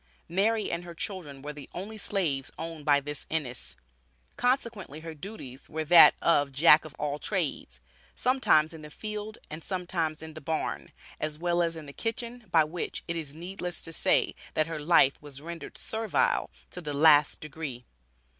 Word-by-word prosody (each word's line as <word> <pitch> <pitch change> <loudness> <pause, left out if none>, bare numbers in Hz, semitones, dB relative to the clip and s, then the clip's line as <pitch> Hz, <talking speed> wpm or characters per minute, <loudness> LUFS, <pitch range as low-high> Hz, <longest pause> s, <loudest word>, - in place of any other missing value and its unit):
Mary 210 +5 +1
and 170 +1 -2
her 170 -1 -9
children 160 -8 -5
were 150 +1 -5
the 145 -2 -10
only 200 +5 -5
slaves 170 -10 0
owned 165 -2 -6
by 145 -1 +5
this 145 +1 -6
Ennis, 140 -6 -3 0.6
consequently 235 - -1
her 165 0 -7
duties 150 - -9
were 160 0 -2
that 170 +3 +9
of 145 -4 +3
"Jack 150 +3 +6
of 155 - -10
all 145 0 -2
trades;" 150 - -2 0.4
sometimes 210 -12 +3
in 160 - -9
the 150 - -9
field 215 +5 -6
and 155 +1 -6
sometimes 175 -4 -2
in 160 0 -8
the 155 - -9
barn, 160 +2 -3 0.3
as 155 -1 -2
well 175 +1 +1
as 165 -1 0
in 160 -2 -8
the 140 - -10
kitchen, 235 +3 -4
by 165 -2 +5
which, 165 +3 -4
it 170 - -2
is 155 -3 -5
needless 180 +1 -5
to 165 - -3
say, - - +3 0.2
that 155 - +3
her 165 -1 -4
life 150 -3 +4
was 145 -2 -7
rendered 165 +2 -8
servile 220 0 0 0.2
to 180 - -6
the 150 -3 -4
last 150 -1 +6
degree. 140 -5 -6
160 Hz, 175 wpm, -29 LUFS, 150-180 Hz, 0.6 s, that